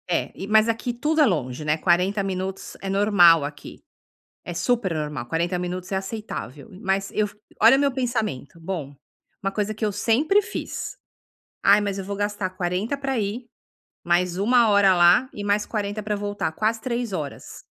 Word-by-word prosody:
É, 175 - 0
e 195 - -6
mas 215 +1 +5
aqui 230 +2 -1
tudo 305 +6 +1
é - - +7
longe, 130 - -1
né, 150 +1 +1
40 185 +4 +2
minutos 190 0 -4
é 195 - -4
normal 190 -6 +5
aqui, 145 0 -9 0.6
é 175 - -5
super 215 -1 0
normal, 150 -5 -4
40 170 +7 -1
minutos 180 +1 -5
é - - +1
aceitável, 190 - -6
e 185 - -12
mas 195 -1 -1
eu 215 - +1
f - - -18 0.2
olha 230 +5 +7
o - - +1
meu 280 -1 +2
pensamento, 225 - -3
bom, 160 -5 -5 0.5
uma 195 0 -1
coisa 210 +1 -2
que 215 - -3
eu 210 - 0
sempre 280 - +2
fiz, - - -5 0.7
"Ai, 200 +1 +6
mas 200 -1 -2
eu 195 - -4
vou 200 +1 -4
gastar 205 -2 -2
40 185 +7 -2
pra 270 -2 -2
ir, 220 +4 -3 0.6
mais 175 +1 +1
uma 230 +4 +4
hora 200 -2 +5
lá 175 +9 +5
e 205 - -7
mais 205 +1 +1
40 210 -1 -3
para 210 0 -2
voltar, 205 -5 -3
quase 220 +6 0
3 235 -2 -3
horas, 150 -6 -6
200 Hz, 185 wpm, -24 LUFS, 180-220 Hz, 0.7 s, é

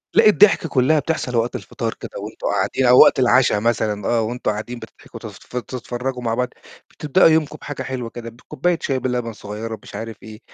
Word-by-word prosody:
لأ، - - +6
الضحكة 200 -5 +5
كلّها 135 +4 +3
بتحصل 145 -4 -2
وقت 115 +1 0
الفطار 115 -3 -4
كده، - - -10
وأنتم - - -6
قاعدين 130 - 0
أو 125 +1 +7
وقت - - +6
العشا 125 -4 +4
مثلًا 105 -3 -1
آه 115 -1 +2
وأنتم 120 0 -2
قاعدين 110 +3 -6
بتضحكم 110 - -13
تنف - - -9 0.3
تتفرّجوا 125 0 -5
مع 115 -1 -1
بعض، 125 +1 -1 0.4
بتبدأوا 160 +5 +3
يومكم 160 -2 +1
بحاجة 145 - -6
حلوة 125 -3 -5
كده 115 0 -8
بكوباية 140 +8 -2
شاي 135 -2 -1
بلبن 125 -2 -2
صغيّرة 105 +2 -7
مش - - -11
عارف 115 -1 -7
إيه، 110 -1 -11
125 Hz, 190 wpm, -20 LUFS, 115-135 Hz, 0.4 s, أو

